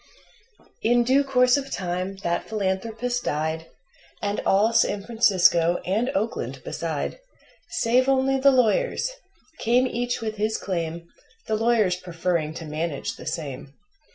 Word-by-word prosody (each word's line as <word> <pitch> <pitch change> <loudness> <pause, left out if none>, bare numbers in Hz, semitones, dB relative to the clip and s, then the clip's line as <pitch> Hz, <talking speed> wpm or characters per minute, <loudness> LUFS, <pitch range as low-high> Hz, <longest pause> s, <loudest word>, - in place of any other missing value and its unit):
In 240 +2 +3
due 265 +4 +3
course 250 -1 +4
of 275 -1 -4
time 185 -1 -3
that 170 0 -1
philanthropist 220 +4 -2
died, 160 +2 -2 0.5
And 205 0 -2
all 210 +4 +3
San 205 -3 +2
Francisco, 185 -7 +3
and 220 +7 0
Oakland 215 +4 -2
beside - - -3 0.5
Save 255 -5 +2
only 270 0 +2
the 275 +1 +6
lawyers 265 - +2 0.5
came 245 +3 +3
each 245 -1 -2
with 220 -1 -4
his 215 +1 0
claim, 170 -2 -4 0.4
The 220 - -2
lawyers 215 -5 +2
preferring 170 -3 -2
to 165 - -6
manage 155 -1 -3
the - - -10
same. 140 -3 -5
215 Hz, 130 wpm, -24 LUFS, 175-245 Hz, 0.5 s, the